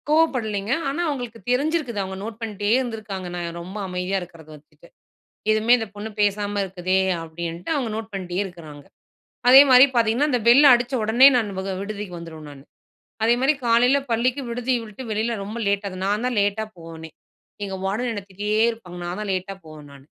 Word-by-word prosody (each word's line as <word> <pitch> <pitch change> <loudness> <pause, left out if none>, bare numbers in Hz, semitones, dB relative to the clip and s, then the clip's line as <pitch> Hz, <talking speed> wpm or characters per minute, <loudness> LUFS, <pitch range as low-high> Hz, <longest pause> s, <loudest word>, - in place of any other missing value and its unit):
கோவப்படலைங்க. 235 -9 +1 0.2
ஆனா 290 +5 -2
அவங்களுக்கு 245 -5 -5
தெரிஞ்சிருக்குது 275 -3 0
அவங்க 190 0 -6
நோட் 225 +1 -7
பண்ணிட்டே 205 -2 -3
இருந்துருக்காங்க, 220 -7 -5
நாங்க 175 -1 -4
ரொம்ப 185 +4 -8
அமைதியா 180 +1 -2
இருக்கிறத 165 -3 -12
வச்சுட்டு. 150 - -20 0.6
எதுவுமே 215 +2 +3
இந்த 225 - -4
பொண்ணு 205 +1 -6
பேசாம 205 0 0
இருக்குதே 185 0 -1 0.3
அப்படின்ட்டு 170 - -6
அவங்க 250 -5 -2
நோட் 220 0 -6
பண்ணிட்டே 185 -1 -3
இருக்குறாங்க. 155 -6 -12 0.6
அதேமாதிரி 260 0 +9
பார்த்தீங்கன்னா 235 +5 +2
அந்த 250 -3 +1
பெல் 275 +5 +8
அடிச்ச 245 +1 +2
உடனே 230 +5 +6
நான் 220 -4 0
வக 190 0 -3
விடுதிக்கு 200 -2 -6
வந்துருவேன் 160 -2 -10
நானு. 140 -1 -13 0.6
அதே 230 +1 +4
மாதிரி 270 +4 +3
காலையில 240 +4 +4
பள்ளிக்கு 245 +4 +1
விடுதியை 245 +1 -1
விட்டு 215 +3 -10
வெளியில 220 +2 -1
ரொம்ப 210 +4 -6
லேட்டாது 200 -1 -1
நான் 205 +3 0
தான் 250 -1 -1
லேட்டா 205 +2 0
போவேனே. 165 -1 -10 0.5
எங்க 195 -1 -4
வார்டன் 220 +6 -1
என்ன 205 -3 -4
திட்டிட்டே 210 +3 -1
இருப்பாங்க. 180 -6 -11
நான் 175 +3 -4
தான் 210 - -4
லேட்டா 190 +1 -3
போவேன் 155 -2 -12
நானு. 140 -1 -15
210 Hz, 170 wpm, -23 LUFS, 185-240 Hz, 0.6 s, அதேமாதிரி